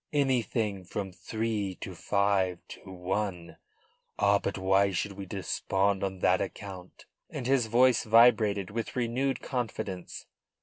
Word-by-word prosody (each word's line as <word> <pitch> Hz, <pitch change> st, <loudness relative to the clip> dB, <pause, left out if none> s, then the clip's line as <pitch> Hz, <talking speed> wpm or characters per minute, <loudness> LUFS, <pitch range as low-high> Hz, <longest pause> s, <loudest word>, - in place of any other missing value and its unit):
anything 120 Hz, -8 st, 0 dB
from 95 Hz, +1 st, -5 dB
three 105 Hz, +1 st, -3 dB
to -, -, -7 dB
five 100 Hz, -3 st, +1 dB
to -, -, -10 dB
one. 90 Hz, -1 st, -3 dB, 0.6 s
Ah, 100 Hz, 0 st, +4 dB
but 100 Hz, -, -3 dB
why 95 Hz, +1 st, +3 dB
should 95 Hz, +2 st, -2 dB
we 100 Hz, 0 st, -8 dB
despond 95 Hz, +1 st, -1 dB
on 95 Hz, -1 st, -3 dB
that 90 Hz, +2 st, +3 dB
account?" 95 Hz, -2 st, -7 dB, 0.2 s
And -, -, -6 dB
his 130 Hz, -3 st, +2 dB
voice 125 Hz, +1 st, +4 dB
vibrated 110 Hz, -4 st, +4 dB
with 115 Hz, +1 st, -4 dB
renewed 125 Hz, +3 st, -1 dB
confidence. 105 Hz, -8 st, -4 dB
100 Hz, 130 wpm, -29 LUFS, 95-115 Hz, 0.6 s, Ah